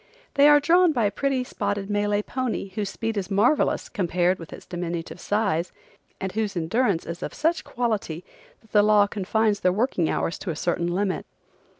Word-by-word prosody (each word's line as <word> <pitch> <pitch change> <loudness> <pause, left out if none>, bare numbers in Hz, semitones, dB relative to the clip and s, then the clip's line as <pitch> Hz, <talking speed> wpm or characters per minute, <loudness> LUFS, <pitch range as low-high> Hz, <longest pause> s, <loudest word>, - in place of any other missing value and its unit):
They 280 +1 +6
are 295 0 +7
drawn 340 +3 +4
by 235 -5 +1
a 200 - +1
pretty 265 +4 0
spotted 205 -4 -3
Malay 205 0 0
pony 250 -6 -3
whose 200 +1 -3
speed 225 +2 -3
is 195 -2 -2
marvelous 215 +9 +2
compared 180 -3 0
with 165 - -10
its - - -10
diminutive 175 -1 -5
size, 195 -5 0 0.5
and 190 - -3
whose 210 -3 -2
endurance 190 +2 +1
is 170 +1 -6
of - - -5
such 325 +2 0
quality 210 -9 -2 0.4
that 220 - -25
the 210 - +5
law 210 -1 +5
confines 205 +1 0
their 180 - +3
working 190 -5 0
hours 165 - -1
to 190 - -5
a 165 - -2
certain 170 +2 -1
limit. 185 +2 -1
205 Hz, 185 wpm, -25 LUFS, 180-225 Hz, 0.5 s, are